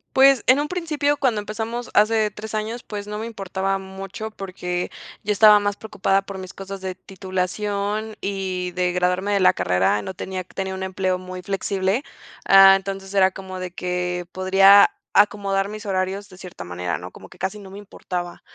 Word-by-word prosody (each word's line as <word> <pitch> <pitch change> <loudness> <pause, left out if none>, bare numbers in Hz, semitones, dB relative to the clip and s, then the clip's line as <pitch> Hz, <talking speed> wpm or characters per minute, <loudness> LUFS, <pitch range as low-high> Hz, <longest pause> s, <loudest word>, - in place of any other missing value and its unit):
Pues, 270 -1 +6
en 260 +3 +5
un 295 - -3
principio, 300 -5 0
cuando 250 -7 +1
empezamos 225 +3 -5
hace 215 0 +3
3 215 +2 -7
años, 220 +3 -3
pues 205 -1 -6
no 210 0 -5
me 220 - -4
importaba 195 -3 -2
mucho, 195 +3 -7
porque 180 -3 -4 0.4
yo 210 - +2
estaba 210 0 +7
más 205 0 -1
preocupada 195 -2 0
por 195 0 -8
mis 185 -1 -8
cosas 195 0 -7
de 190 -1 -5
titulación 200 +3 -3
y 190 -2 -3
de 180 -1 +1
graduarme 180 +3 +1
de 200 - +2
la 185 - +7
carrera. 90 +3 +1
No 190 - -5
tenía 185 -1 -5
tenía 190 +1 -5
un 190 0 -5
empleo 190 -1 -1
muy 185 0 -8
flexible, 195 +3 -1 0.4
ah, 195 0 +8
entonces, 195 0 -6
era 190 -1 +4
como 185 -1 -8
de 185 -1 -5
que, 180 0 -3
podría 195 +2 +6 0.3
acomodar 200 -1 +3
mis 215 +1 -8
horarios 190 +1 -2
de 185 - -14
cierta 180 -1 -9
manera, 90 0 -3
¿no?, 90 +1 -9
como - - -13
que - - -16
casi 190 +3 -3
no 195 -2 -11
me 195 - -9
importaba. 180 -3 -6
195 Hz, 185 wpm, -22 LUFS, 185-210 Hz, 0.4 s, ah